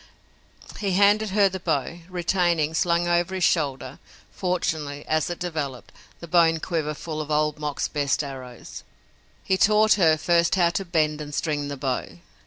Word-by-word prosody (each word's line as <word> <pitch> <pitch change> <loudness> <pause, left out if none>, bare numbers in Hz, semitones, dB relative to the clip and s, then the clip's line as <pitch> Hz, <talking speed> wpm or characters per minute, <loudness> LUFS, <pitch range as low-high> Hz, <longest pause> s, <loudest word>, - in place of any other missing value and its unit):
He 200 -3 -1
handed 205 +3 +4
her 200 +1 +4
the 190 0 -5
bow, 165 -1 -2
retaining, 175 -3 0
slung 170 +1 +1
over 175 +2 +1
his 185 - -2
shoulder, 140 -7 0 0.3
fortunately, 155 -5 -2
as 155 +1 0
it 175 - -4
developed, 150 -8 -5 0.3
the 170 - -8
bone 165 -1 +3
quiver 155 -3 -2
full 155 0 -5
of 150 - -7
Old 150 0 0
Mok's 150 -2 -2
best 145 0 -1
arrows. 130 -3 -9 0.6
He 190 - +1
taught 215 +2 +5
her, 160 -2 +5
first, 170 +2 +2
how 175 -2 +3
to 195 +3 -3
bend 155 -3 0
and 145 -1 -7
string 145 -3 -1
the 140 -1 -5
bow. 130 -9 -3
165 Hz, 165 wpm, -24 LUFS, 150-180 Hz, 0.6 s, taught